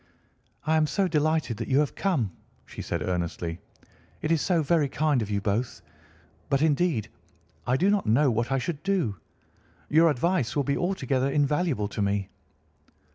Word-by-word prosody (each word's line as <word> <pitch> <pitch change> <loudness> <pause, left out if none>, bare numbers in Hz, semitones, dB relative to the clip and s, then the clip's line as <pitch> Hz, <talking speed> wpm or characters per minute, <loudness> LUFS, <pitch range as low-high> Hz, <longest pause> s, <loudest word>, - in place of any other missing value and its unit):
"I 160 +1 +3
am 155 -1 +3
so 190 +6 +1
delighted 155 - 0
that - - -4
you 135 - +2
have 145 -1 +2
come," 150 - 0 0.3
she - - -8
said - - -3
earnestly. 85 -1 -3 0.6
"It 155 - 0
is 165 -3 +3
so 175 -4 +1
very 150 -1 +2
kind 150 -3 +1
of 105 - -4
you 100 -1 -1
both; 110 +4 -2 0.7
but 140 - +2
indeed 155 - +1 0.6
I 125 +2 +2
do 185 - +2
not 205 -2 0
know 130 +5 +4
what 115 +3 -1
I 135 - +2
should 145 +3 -3
do. 175 - 0 0.7
Your 165 +2 +5
advice 150 -2 0
will 145 - +2
be 140 +1 0
altogether 140 -8 0
invaluable 145 - +1
to 105 - -4
me." 100 -1 0
140 Hz, 170 wpm, -26 LUFS, 115-160 Hz, 0.7 s, Your